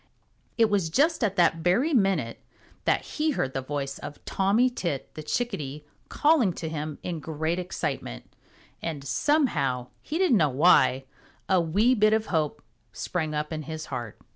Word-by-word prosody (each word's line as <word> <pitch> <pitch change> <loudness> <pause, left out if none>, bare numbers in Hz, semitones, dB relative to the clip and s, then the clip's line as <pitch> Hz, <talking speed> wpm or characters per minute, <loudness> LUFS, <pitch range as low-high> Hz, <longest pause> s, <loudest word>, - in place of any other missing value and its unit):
It 230 -1 +5
was 200 -6 0
just 295 - +2
at 200 -3 +1
that 170 -3 +4
very 185 - +2
minute 195 - +1 0.5
that - - +2
he 310 +1 -1
heard 130 0 -1
the 135 - -2
voice 140 0 -4
of 145 - -9
Tommy 200 +6 +2
Tit 175 - -4
the 155 - -7
Chickadee 150 - -3 0.2
calling 290 - +3
to 165 - -5
him 155 -1 -4
in 175 -3 -3
great 160 +3 -2
excitement, 150 - -4 0.6
and 155 -4 -4
somehow, 140 - +1
he 310 - -3
didn't 360 - +4
know 155 -5 +3
why, 135 -2 +4 0.4
a 185 -2 +3
wee 205 +10 +3
bit 215 -2 +4
of 220 0 +1
hope 155 -2 0 0.3
sprang 155 -4 -3
up 150 +2 -2
in 155 - -3
his 155 +1 -6
heart. 115 -4 -5
165 Hz, 165 wpm, -26 LUFS, 150-215 Hz, 0.6 s, It